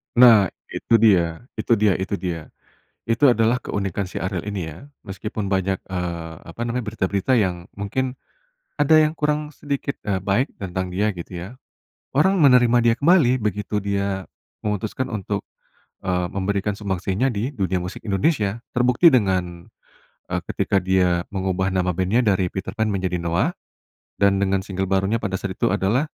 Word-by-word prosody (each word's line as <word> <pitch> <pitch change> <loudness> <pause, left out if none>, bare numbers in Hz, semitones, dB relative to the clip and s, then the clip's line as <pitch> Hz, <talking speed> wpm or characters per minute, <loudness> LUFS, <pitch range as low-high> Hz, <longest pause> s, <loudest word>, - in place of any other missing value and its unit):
Nah 115 -5 +7 0.2
itu 115 - +1
dia 95 -4 +3 0.2
itu 115 - +3
dia 105 -2 +3
itu 95 +2 -2
dia. 85 -5 -4 0.6
Itu 115 +5 +3
adalah 115 +1 +3
keunikan 100 -2 -3
si - - -10
Ariel 95 -1 -2
ini 100 -4 -3
ya. 85 - -12 0.2
Meskipun 100 +1 -5
banyak, 95 0 +1
eee, 85 -3 -4
apa 100 - -10
namanya, 120 -1 -2
berita-berita 100 +3 0
yang, 90 -6 0
mungkin, 125 +6 -2 0.7
ada 155 +2 +5
yang 155 0 +4
kurang 150 -1 -1
sedikit, 140 -1 -4
eee, 100 -2 -1
baik 115 +8 +1
tentang 95 -1 -4
dia 100 +4 0
gitu 90 0 -9
ya. 85 +3 -6 0.7
Orang 190 +8 +3
menerima 125 -5 +6
dia 115 - +5
kembali, 135 -4 +3
begitu 105 0 -2
dia, 100 -1 -2 0.3
memutuskan 105 +4 -2
untuk, 105 -4 -3 0.7
eee, 90 -1 +1
memberikan 100 +1 -1
sumbangsinya 95 +3 -1
di, 115 +2 -2
dunia 95 -8 -1
musik 90 +4 -7
Indonesia. 105 - 0
Terbukti 125 +7 +4
dengan, 90 -7 0 0.7
eee, - - 0
ketika 100 - +1
dia 90 -1 +1
mengubah 95 -1 -1
nama 90 -1 0
band-nya 95 +8 +1
dari 95 -3 +2
Peterpan 110 +4 -3
menjadi 95 -3 -1
Noah, 85 - 0 0.7
dan 100 -1 +4
dengan 95 -1 +1
single 95 -1 -3
barunya 95 +4 +1
pada 100 -3 -3
saat 95 -2 -4
itu - - +1
adalah, 105 +9 +1
100 Hz, 155 wpm, -22 LUFS, 95-120 Hz, 0.7 s, Nah